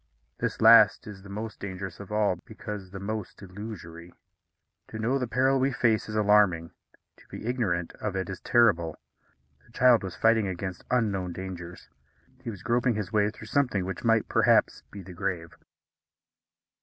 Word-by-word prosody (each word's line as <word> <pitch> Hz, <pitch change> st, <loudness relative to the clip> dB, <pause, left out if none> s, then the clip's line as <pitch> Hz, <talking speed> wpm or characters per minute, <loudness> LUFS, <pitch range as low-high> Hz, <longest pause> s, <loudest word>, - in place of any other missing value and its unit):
This -, -, -3 dB
last -, -, +7 dB
is 100 Hz, -3 st, -10 dB
the 100 Hz, -, -13 dB
most 105 Hz, +2 st, -6 dB
dangerous 95 Hz, -2 st, -6 dB
of 100 Hz, 0 st, -10 dB
all, 105 Hz, -4 st, +1 dB
because 105 Hz, -4 st, -8 dB
the 95 Hz, +1 st, -8 dB
most 105 Hz, +1 st, -5 dB
illusory. 90 Hz, -4 st, -9 dB, 0.8 s
To 110 Hz, -, -8 dB
know 120 Hz, +5 st, 0 dB
the 125 Hz, -, -2 dB
peril 130 Hz, +3 st, +2 dB
we 135 Hz, +1 st, +2 dB
face 120 Hz, -5 st, +1 dB
is 105 Hz, -, -5 dB
alarming; 105 Hz, -6 st, +3 dB, 0.5 s
to -, -, -21 dB
be -, -, -9 dB
ignorant 100 Hz, -9 st, -1 dB
of 100 Hz, -2 st, -3 dB
it 95 Hz, 0 st, -2 dB
is 95 Hz, -2 st, -6 dB
terrible. 85 Hz, -10 st, +2 dB, 0.7 s
The -, -, -24 dB
child 125 Hz, -2 st, +5 dB
was 95 Hz, -2 st, -6 dB
fighting 110 Hz, -2 st, +3 dB
against 95 Hz, 0 st, -5 dB
unknown 100 Hz, -7 st, 0 dB
dangers. 90 Hz, -1 st, -8 dB, 0.5 s
He -, -, -6 dB
was 100 Hz, -5 st, -8 dB
groping 120 Hz, 0 st, +1 dB
his 105 Hz, -4 st, -4 dB
way 105 Hz, -1 st, +3 dB
through 110 Hz, -, -11 dB
something 125 Hz, -10 st, 0 dB
which 95 Hz, -1 st, -5 dB
might, 115 Hz, -2 st, +2 dB
perhaps, -, -, +3 dB
be 100 Hz, -2 st, -10 dB
the 90 Hz, 0 st, -11 dB
grave. 85 Hz, -2 st, -4 dB
105 Hz, 170 wpm, -27 LUFS, 95-115 Hz, 0.8 s, last